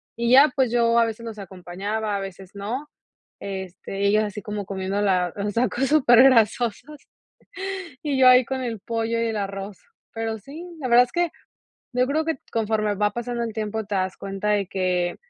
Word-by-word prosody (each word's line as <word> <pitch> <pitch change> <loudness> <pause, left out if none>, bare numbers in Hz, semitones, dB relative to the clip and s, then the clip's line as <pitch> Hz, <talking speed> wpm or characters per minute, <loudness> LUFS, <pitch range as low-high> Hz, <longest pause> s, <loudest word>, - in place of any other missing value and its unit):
Y 235 +1 0
ya, 280 +3 +8
pues 265 -3 +2
yo 235 -1 +3
a 230 - +5
veces 225 +1 -6
los 220 -2 -7
acompañaba, 195 +3 -4
a - - -1
veces 195 -1 -8
no, 235 +9 -5 0.5
este, 195 +1 -4
ellos 215 +2 +4
así 210 -1 -5
como 210 0 -4
comiendo 195 +1 -3
la 180 -3 +1
los 205 0 -3
tacos 245 +3 +1
supergrasosos 250 0 +3 0.9
y 285 -3 -1
yo 255 -1 +7
ahí 250 0 +7
con 265 +2 -3
el 230 -5 -4
pollo 230 +1 -2
y 230 - +1
el 220 - -2
arroz. 195 0 -5 0.4
Pero 225 -1 -3
sí, 285 - -10 0.2
la 255 - -3
verdad 245 +1 +7
es - - -21
que 345 -2 +1 0.6
yo 250 +1 +2
creo 310 +3 +1
que 325 - 0
t - - -40
conforme 215 -2 0
va 210 +1 +1
pasando 240 0 -3
el 225 - -4
tiempo 220 0 -3
te 205 0 -5
das 185 0 -1
cuenta 195 +1 -4
de 205 -2 +1
que, 180 -2 -1
220 Hz, 190 wpm, -24 LUFS, 200-245 Hz, 0.9 s, ya